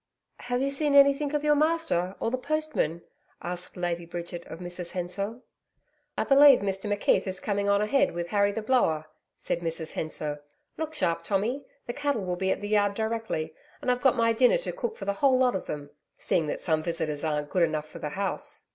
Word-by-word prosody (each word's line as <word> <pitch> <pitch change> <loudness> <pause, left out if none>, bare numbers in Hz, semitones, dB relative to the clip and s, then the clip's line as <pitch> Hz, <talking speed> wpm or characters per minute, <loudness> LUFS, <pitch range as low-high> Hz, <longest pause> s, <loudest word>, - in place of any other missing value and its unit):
'Have 245 +1 -1
you 275 - 0
seen 285 0 +1
anything 280 +1 +5
of 295 - 0
your 300 0 +4
master 300 - +1
or 230 - -1
the 255 - 0
postman?' 305 - -1 0.4
asked 175 +1 -6
Lady 175 -1 -2
Bridget 170 0 -6
of - - -8
Mrs 175 0 -5
Hensor. 195 +6 -3 0.8
'I - - +2
believe 280 -2 +7
Mr 195 +1 -2
McKeith 205 0 +2
is 190 0 -3
coming 200 -1 -1
on 200 +1 +3
ahead 275 +6 +2
with 175 0 -3
Harry 200 0 +3
the 215 +2 -4
Blower,' 190 -11 +2 0.3
said - - -2
Mrs 165 -1 -4
Hensor. 150 -2 -4 0.3
'Look 315 0 -4
sharp, 170 - 0
Tommy, 215 +8 -1 0.2
the 240 - -4
cattle 285 -8 -1
will 180 -1 -1
be 190 +1 -1
at - - 0
the 205 - -4
yard 205 -1 +2
directly, 220 -8 -2 0.3
and 250 - 0
I've 250 0 -1
got 265 -1 +4
my 230 -1 +3
dinner 250 - +4
to - - -4
cook 475 -2 -4
for - - -6
the 200 - +1
whole 260 +5 +3
lot 255 -1 +3
of 190 - -4
them, 145 -1 -6 0.3
seeing 165 -3 +1
that - - -3
some 160 -2 +1
visitors 160 -3 -2
aren't 150 -2 -1
good 185 - +1
enough 155 -2 +1
for - - -11
the 150 - -3
house.' 195 +5 -4
200 Hz, 210 wpm, -27 LUFS, 170-260 Hz, 0.8 s, believe